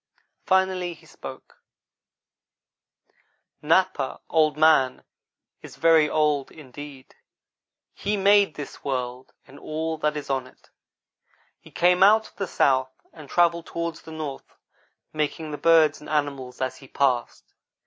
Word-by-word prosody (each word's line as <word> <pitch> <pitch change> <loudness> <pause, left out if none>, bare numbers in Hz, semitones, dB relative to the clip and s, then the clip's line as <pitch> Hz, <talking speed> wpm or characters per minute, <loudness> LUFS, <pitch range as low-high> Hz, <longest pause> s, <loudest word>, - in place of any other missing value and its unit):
Finally 185 -2 +1
he - - -21
spoke: - - -12 2.0
"Napa, 160 -3 +1
Old 155 -2 +3
man, 155 -5 +3 0.6
is - - -12
very 160 -2 +4
old 150 -3 +1
indeed. 145 -2 -12 0.8
He 205 +1 -2
made 200 -3 +4
this 145 - -9
world, 125 -1 -4
and 140 - -15
all 160 +1 -4
that 150 0 0
is 145 - -6
on 135 -2 -2
it. - - -23 0.9
He - - -17
came 180 +1 +2
out 215 +3 +5
of - - -30
the 195 - -3
south, 130 -4 +2 0.2
and 150 -4 -13
travelled 170 -1 +2
toward 170 0 -3
the 160 - -13
north, 155 -4 -7 0.6
making 155 +1 -3
the 150 - -6
birds 160 -2 +4
and 150 - -11
animals 140 -4 -2
as 130 -1 -2
he 135 - -15
passed. 130 -3 -1
155 Hz, 130 wpm, -24 LUFS, 140-170 Hz, 2.0 s, out